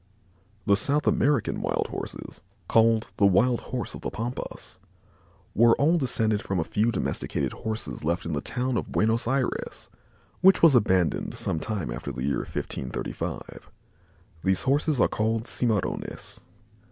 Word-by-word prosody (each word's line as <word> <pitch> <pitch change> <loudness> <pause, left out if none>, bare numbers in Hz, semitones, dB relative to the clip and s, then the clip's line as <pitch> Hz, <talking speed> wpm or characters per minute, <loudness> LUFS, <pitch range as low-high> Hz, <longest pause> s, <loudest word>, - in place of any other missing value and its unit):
The 100 - +5
South 145 +9 +1
American 140 -6 +2
wild - - -1
Horses, - - -7 0.3
called 115 0 +4
"the 100 - +4
wild 120 +6 +3
Horse 125 -1 -4
of - - -8
the - - -3
Pampas," 115 -5 -6 0.7
were 115 +1 +5
all 165 +4 +3
descended 110 -6 +1
from 95 -2 -2
a - - +1
few 110 +7 +1
domesticated - - -2
Horses 110 -6 -5
left 85 +3 -1
in 85 - -3
the 70 - -1
town 125 0 -1
of - - -4
Buenos 110 +2 +1
Ayres, 130 0 -2 0.5
which 190 -1 +6
was 165 -4 +8
abandoned 95 -8 +2
some 80 - -2
time 95 - -3
after - - -5
the 65 - -5
year 70 0 0
1535. 65 - -5 0.7
These 95 -1 +2
Horses 145 +1 +1
are - - +5
called 110 +1 -1
cimarrones. 110 -7 -2
115 Hz, 145 wpm, -26 LUFS, 95-125 Hz, 0.7 s, was